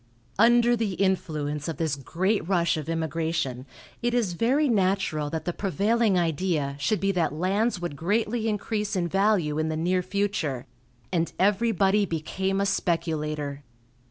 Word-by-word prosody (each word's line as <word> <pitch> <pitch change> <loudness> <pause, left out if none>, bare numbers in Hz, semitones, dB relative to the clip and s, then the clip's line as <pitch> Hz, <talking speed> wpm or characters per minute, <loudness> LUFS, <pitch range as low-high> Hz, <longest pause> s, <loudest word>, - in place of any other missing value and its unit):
Under 240 +1 +5
the 220 -4 -1
influence 155 -6 -1
of 165 - -4
this 160 -3 0
great 180 - -1
rush 175 -4 +2
of 155 0 -5
immigration 160 -5 -2 0.3
it 240 0 0
is 220 -7 +1
very 260 - +2
natural 190 - +1
that 160 +1 -4
the 175 - -1
prevailing 205 +2 +1
idea 165 -4 0
should 205 +9 +1
be 195 0 +1
that 170 -5 0
lands 195 +6 0
would 175 -4 -4
greatly 215 +8 0
increase 210 0 -2
in 175 -2 0
value 190 -5 +1
in 155 0 0
the 155 - -2
near 180 +3 +1
future, 180 -9 -2 0.5
and 170 -1 +1
everybody 205 0 +2
became 190 +4 -2
a 200 - +1
speculator. 155 -6 -1
180 Hz, 150 wpm, -26 LUFS, 160-205 Hz, 0.5 s, Under